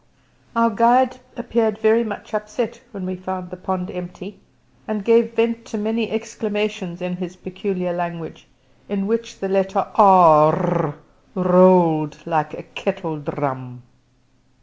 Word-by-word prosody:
Our 230 0 +3
guide 245 +4 +3 0.2
appeared 230 -3 0
very 220 +2 +3
much 215 0 -8
upset 215 +2 -4
when 195 -5 -7
he 185 - -4
found 185 0 -7
the - - -7
pond 185 0 -4
empty, 180 +2 -9 0.5
and 210 -2 -4
gave 230 0 +3
vent 230 0 0
to 220 - -6
many 220 +1 -2
exclamations 215 -4 -4
in 180 0 -4
his 180 -1 -7
peculiar 185 -1 -4
language, 170 -2 -6 0.4
in 200 -1 -2
which 230 +2 -3
the 195 - -4
letter 195 0 0
"r" 170 -4 +5 0.4
rolled 180 -5 +4
like 155 -2 -1
a - - -10
kettledrum. 150 -9 -5
190 Hz, 125 wpm, -20 LUFS, 175-220 Hz, 0.5 s, r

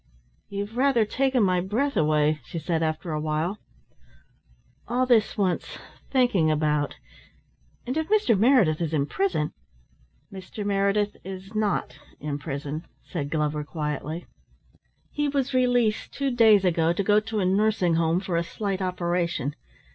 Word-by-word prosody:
"You've 205 +3 -5
rather 260 -4 +3
taken 260 +2 +1
my 185 -2 +2
breath 235 +10 -1
away," 150 0 +2
she 165 - -7
said 165 +1 -1
after 160 +1 -2
a 155 - -1
while. 155 +6 -1 1.3
"All 250 +2 +1
this 230 -4 +3
wants 185 -4 -1 0.3
thinking 245 - +3
about, 150 -1 +1 0.9
and 255 +2 -3
if 320 +2 -1
Mr. 415 - +3
Meredith 205 - +4
is 160 -1 -1
in 140 -2 +1
prison 260 - -1 0.4
" - - -27
"Mr. 195 +2 -7
Meredith 200 +1 +1
is 190 +2 -8
not 205 - -1 0.2
in 145 0 -4
prison," 145 +2 -5 0.2
said 145 -5 -4
Glover 150 -1 -1
quietly. 150 +2 -4 0.9
"He 295 0 0
was 275 -2 -1
released 245 -4 +2
two 275 -1 -1
days 220 -5 +5
ago 165 -1 +2
to 200 - -1
go 210 +2 +4
to 215 0 -3
a 190 - +1
nursing 195 -2 +2
home 165 +2 +2
for 180 -3 -2
a 170 - +1
slight 195 +3 -3
operation. 175 -5 -1
185 Hz, 145 wpm, -25 LUFS, 155-220 Hz, 1.3 s, days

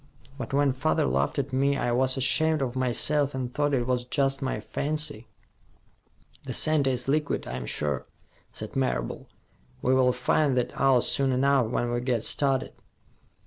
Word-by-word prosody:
But 120 -5 -6
when 140 -1 +2
father 140 +5 +1
laughed 70 +2 0
at 140 -1 -2
me, 140 +2 +2
I 120 - -1
was 130 +2 +2
ashamed 155 +3 +2
of 125 -1 -3
myself 135 +3 0
and 125 -2 -4
thought 145 -1 0
it 120 -2 0
was 125 -1 0
just 135 +2 0
my 130 - -2
fancy." 150 -7 -3 1.2
"The - - -5
center 155 -3 +3
is 130 0 -2
liquid, 150 +1 0
I'm 65 -1 -5
sure," 70 -3 -2 0.4
said 110 - -7
Marable. 130 - -2 0.6
"We 130 - +3
will 130 -1 +4
find 130 +2 +1
that 125 - 0
out 135 -2 +3
soon 135 -1 +1
enough, 135 -1 +2
when 120 +1 -1
we 120 0 -1
get 120 -3 -1
started." 135 -2 +1
130 Hz, 165 wpm, -26 LUFS, 125-140 Hz, 1.2 s, will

